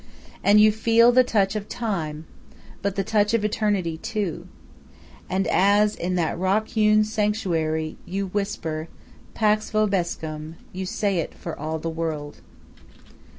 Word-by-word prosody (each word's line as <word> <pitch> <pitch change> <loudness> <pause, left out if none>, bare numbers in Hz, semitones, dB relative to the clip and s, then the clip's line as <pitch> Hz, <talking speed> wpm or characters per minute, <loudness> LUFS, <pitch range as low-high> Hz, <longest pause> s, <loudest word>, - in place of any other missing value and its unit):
And 205 +1 +6
you 215 0 +7
feel 230 +2 +4
the 255 +1 +6
touch 205 -4 +1
of 210 -1 -4
time, 160 -9 -3 0.6
but 200 -1 -1
the 195 - 0
touch 210 +1 +2
of 215 -2 0
eternity, 200 -6 0
too. 205 -5 -3 0.8
And 190 +1 0
as, 205 +3 +3
in 180 +1 -2
that 170 -2 -1
rock 195 +4 +1
hewn 215 -1 +4
sanctuary, 180 -8 -1
you 195 +2 -2
whisper 180 -5 -3 0.5
"Pax 215 0 +2
vobiscum," 170 -7 -1 0.2
you 185 0 -4
say 200 -1 0
it 165 - -4
for - - -6
all 155 +2 -3
the 160 - -5
world. 160 -3 -4
200 Hz, 140 wpm, -24 LUFS, 165-215 Hz, 0.8 s, you